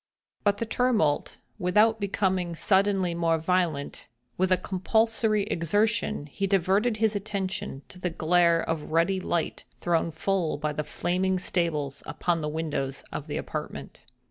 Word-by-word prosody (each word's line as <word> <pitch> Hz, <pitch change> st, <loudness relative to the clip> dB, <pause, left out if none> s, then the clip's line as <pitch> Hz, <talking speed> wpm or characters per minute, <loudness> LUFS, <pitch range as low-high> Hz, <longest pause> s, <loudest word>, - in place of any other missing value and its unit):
But 205 Hz, -1 st, +3 dB
the 230 Hz, -, -2 dB
tumult 220 Hz, -11 st, +1 dB, 0.2 s
without 210 Hz, +5 st, +3 dB
becoming 190 Hz, -3 st, 0 dB
suddenly 190 Hz, -1 st, +2 dB
more 165 Hz, -1 st, +2 dB
violent, 165 Hz, -3 st, -1 dB, 0.3 s
with 185 Hz, +1 st, +1 dB
a 185 Hz, -, +5 dB
compulsory 215 Hz, +3 st, +1 dB
exertion 205 Hz, +1 st, 0 dB
he 195 Hz, +7 st, -3 dB
diverted 195 Hz, +4 st, +2 dB
his 220 Hz, -1 st, +2 dB
attention 195 Hz, -8 st, -3 dB
to 180 Hz, -, -11 dB
the 180 Hz, -, -1 dB
glare 170 Hz, 0 st, +3 dB
of 160 Hz, -2 st, -2 dB
ruddy 170 Hz, +4 st, +2 dB
light 170 Hz, -3 st, -2 dB, 0.2 s
thrown 170 Hz, -1 st, +1 dB
full 165 Hz, +1 st, -1 dB
by 150 Hz, 0 st, -2 dB
the 150 Hz, -, -2 dB
flaming 185 Hz, +5 st, 0 dB
stables 155 Hz, -6 st, -1 dB
upon 170 Hz, -2 st, -1 dB
the 150 Hz, -, -2 dB
windows 150 Hz, -4 st, -3 dB
of -, -, -5 dB
the -, -, -3 dB
apartment. -, -, -6 dB
180 Hz, 145 wpm, -27 LUFS, 165-200 Hz, 0.3 s, a